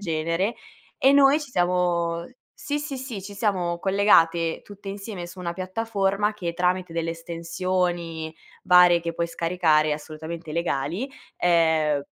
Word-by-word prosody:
genere, 165 +4 -1 0.4
e 270 +1 +5
noi 280 +2 +5
ci 295 -3 -8
siamo 175 -3 0 0.3
sì, 290 0 -3
sì, 290 -3 -5
sì, 245 -7 -6
ci 200 +2 -8
siamo 185 -5 -1
collegate 170 -4 +3
tutte 200 -1 -11
insieme 195 -3 -6
su 180 +2 -12
una 170 -1 -4
piattaforma, 200 +1 -1
che 175 -5 -4
tramite 180 0 0
delle 165 0 -2
estensioni 170 -1 -3 0.3
varie 180 -1 +6
che 170 0 -4
puoi 170 0 -1
scaricare, 165 -3 +2
assolutamente 160 +1 -8
legali, 170 - -2 0.3
ehm, 160 -4 +3
175 Hz, 135 wpm, -24 LUFS, 165-195 Hz, 0.4 s, varie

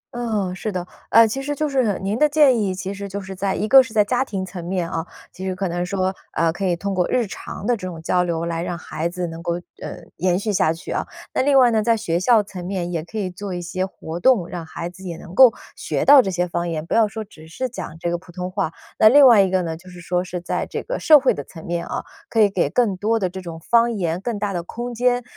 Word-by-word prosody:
嗯， 215 -6 -1
是 215 +2 -4
的。 180 -2 -3 0.2
啊， 230 0 +7
其 245 +5 -2
实 290 +1 -3
就 305 +1 -1
是 255 -8 +1
您 200 +4 -2
的 300 0 +4
建 285 -5 +5
议， 190 -2 -1
其 190 +1 -4
实 200 0 -7
就 200 +1 -4
是 190 0 -7
在 195 +1 -1
一 210 - -1
个 265 +3 +9
是 230 -3 -7
在 210 -1 +5
家 250 +3 +1
庭 195 -7 -4
层 180 -1 -8
面 175 -1 -2
啊， 165 -1 -3 0.3
其 185 - -10
实 185 -1 -2
可 190 0 -2
能 175 +1 -2
说， 185 +1 -1 0.2
呃， 165 0 +1
可 195 - -5
以 175 - +2
通 200 +3 -3
过 180 -1 +1
日 250 -2 +1
常 195 0 -8
的 245 +2 +2
这 185 -4 -6
种 165 -3 -7
交 180 +2 +1
流 170 -1 -2
来 165 0 -2
让 175 0 -3
孩 165 -1 -4
子 180 0 -4
能 165 0 -7
够， 170 - -1 0.3
呃， - - -7
延 180 +1 +1
续 210 +1 -2
下 160 -4 +3
去 165 - -7
啊。 - - -2 0.3
那 - - +2
另 275 0 +4
外 245 -2 +6
呢， 220 -1 +2
在 230 +1 +2
学 170 -6 -1
校 220 +1 +4
层 190 -3 -8
面 180 -3 -3
也 165 -2 -2
可 215 +6 -9
以 190 -3 -2
做 190 0 -6
一 175 - -4
些 185 +2 -2
活 165 -2 -7
动 215 -7 +3
让 175 -2 -6
孩 170 - -5
子 180 +2 -12
也 170 -3 -5
能 175 - -11
够 260 0 +8 0.2
学 - - -2
到 280 -1 +9
这 195 - -3
些 180 -1 0
方 170 0 -2
言， 155 -1 -3
不 - - -4
要 225 -1 +4
说 220 +1 -6
只 160 -6 -15
是 255 +11 -3
讲 225 -9 -7
这 170 0 -2
个 175 - -1
普 175 - -16
通 180 +1 -5
话。 185 -4 -1 0.3
那 215 - +8
另 285 +2 +8
外 230 -6 +8
一 190 - +2
个 185 -1 +1
呢， 165 -1 -3
就 175 +3 -14
是 180 -1 -11
说 180 +1 -1
是 180 -1 -5
在 175 - -3
这 - - -4
个 - - -4
社 305 -2 +7
会 265 - +3
的 145 - -6
层 160 +2 -12
面 170 0 -3
啊， - - -3 0.3
可 225 - 0
以 205 -2 +5
给 175 -7 +1
更 215 0 +1
多 225 +4 +1
的 185 -4 -1
这 190 0 -7
种 165 -2 -8
方 235 +6 +3
言， 175 -4 -2
更 235 -2 -3
大 205 -1 -2
的 175 - -2
空 240 +7 -6
间， 245 +1 +1
190 Hz, 305 characters per minute, -21 LUFS, 175-225 Hz, 0.3 s, 个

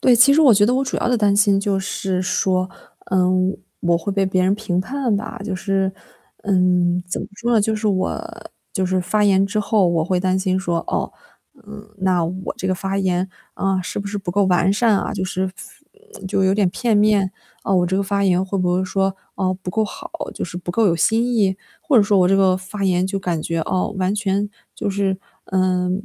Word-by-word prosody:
对， 255 - +5
其 255 +4 +6
实 315 - +4
我 270 -7 +7
觉 205 +1 +4
得 250 - +2
我 270 - +1
主 260 - -3
要 - - -1
的 245 - +2
担 205 -2 +2
心 200 -1 +4
就 200 -1 0
是 190 -1 -2
说， 185 -1 0 0.4
嗯， 185 0 +2 0.2
我 170 -1 +2
会 195 +4 -3
被 195 0 +1
别 185 -1 +1
人 190 +2 +3
评 190 -4 -1
判 255 0 -1
吧。 205 -1 -6
就 200 -3 -3
是， 195 0 0 0.5
嗯， 180 -2 +2
怎 180 - -3
么 - - -6
说 240 +2 -1
呢， 225 - +4
就 220 +2 0
是 215 +1 -3
我 185 -2 -1 0.5
就 190 -2 0
是 185 0 0
发 210 +4 +1
言 195 -1 +4
之 215 +2 -2
后， 205 -2 +2
我 165 -2 +1
会 185 +2 0
担 185 0 +1
心 190 -1 0
说， 175 -3 -1
哦， - - -2 0.5
嗯， 210 0 -11
那 185 -2 +1
我 185 +3 -4
这 190 - -4
个 185 - +1
发 195 +1 -3
言， 185 -1 0 0.3
啊， 195 -1 0
是 180 - -5
不 200 - -4
是 205 +1 -4
不 195 -2 -5
够 200 +3 +2
完 185 0 +3
善 215 0 +3
啊， - - -3
就 195 -3 -2
是 185 0 -2 0.8
就 195 0 +1
有 190 +1 +3
点 200 -3 +2
片 230 +2 0
面。 205 -2 +3 0.3
嗯， 195 - +2
我 175 - +2
这 190 +2 0
个 200 - +1
发 200 +1 -1
言 185 -1 +3
会 195 +1 -3
不 180 -1 +1
会 185 +1 0
说， 195 0 0 0.2
哦， 185 -1 0
不 180 - -4
够 220 - +1
好， - - -8 0.2
就 - - -3
是 175 0 -8
不 175 0 -5
够 225 +4 +2
有 175 - +3
新 230 +8 +1
意？ 195 -4 +2 0.2
或 315 -5 +2
者 215 - +7
说 200 -1 +3
我 180 -1 +4
这 195 - +4
个 190 -1 +4
发 190 +2 -5
言 180 0 +2
就 195 +1 -2
感 175 -4 -2
觉， 165 +1 -2
哦， 185 +5 -1
完 185 +2 0
全 205 -1 -1 0.3
就 - - -2
是， 195 -1 0 0.3
呃， 185 -1 +1
190 Hz, 245 characters per minute, -20 LUFS, 185-205 Hz, 0.8 s, 我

